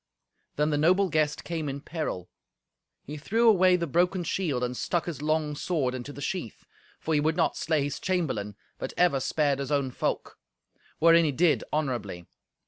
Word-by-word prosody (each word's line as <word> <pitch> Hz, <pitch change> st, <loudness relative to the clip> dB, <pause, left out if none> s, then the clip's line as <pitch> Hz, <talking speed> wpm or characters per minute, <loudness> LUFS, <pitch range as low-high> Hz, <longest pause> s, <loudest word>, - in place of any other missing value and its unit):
Then 150 Hz, +1 st, +1 dB
the 145 Hz, -, +1 dB
noble 185 Hz, +5 st, +3 dB
guest 155 Hz, -2 st, 0 dB
came 160 Hz, -4 st, -3 dB
in 140 Hz, +1 st, -4 dB
peril. 150 Hz, -, -4 dB, 0.8 s
He 150 Hz, +2 st, -7 dB
threw 225 Hz, +10 st, +1 dB
away 185 Hz, -4 st, +6 dB
the 170 Hz, -1 st, -1 dB
broken 175 Hz, +4 st, +1 dB
shield 155 Hz, -9 st, -1 dB
and 125 Hz, 0 st, -2 dB
stuck 170 Hz, +6 st, -1 dB
his 160 Hz, -5 st, -5 dB
long 155 Hz, -1 st, 0 dB
sword 145 Hz, -5 st, -1 dB
into 130 Hz, +2 st, -6 dB
the 145 Hz, 0 st, -8 dB
sheath, 175 Hz, -, -5 dB, 0.3 s
for 160 Hz, -, -2 dB
he 150 Hz, -, +3 dB
would 155 Hz, +2 st, 0 dB
not 170 Hz, -, +2 dB
slay 155 Hz, -3 st, 0 dB
his 140 Hz, 0 st, -3 dB
chamberlain, 130 Hz, -, -2 dB, 0.2 s
but -, -, -5 dB
ever 175 Hz, -6 st, +3 dB
spared 140 Hz, 0 st, 0 dB
his 140 Hz, +1 st, -4 dB
own 140 Hz, -3 st, +1 dB
folk; -, -, -3 dB, 0.6 s
wherein 165 Hz, +1 st, +6 dB
he 155 Hz, -, +1 dB
did 160 Hz, +4 st, +2 dB
honourably. 120 Hz, -, -2 dB
155 Hz, 180 wpm, -27 LUFS, 140-170 Hz, 0.8 s, away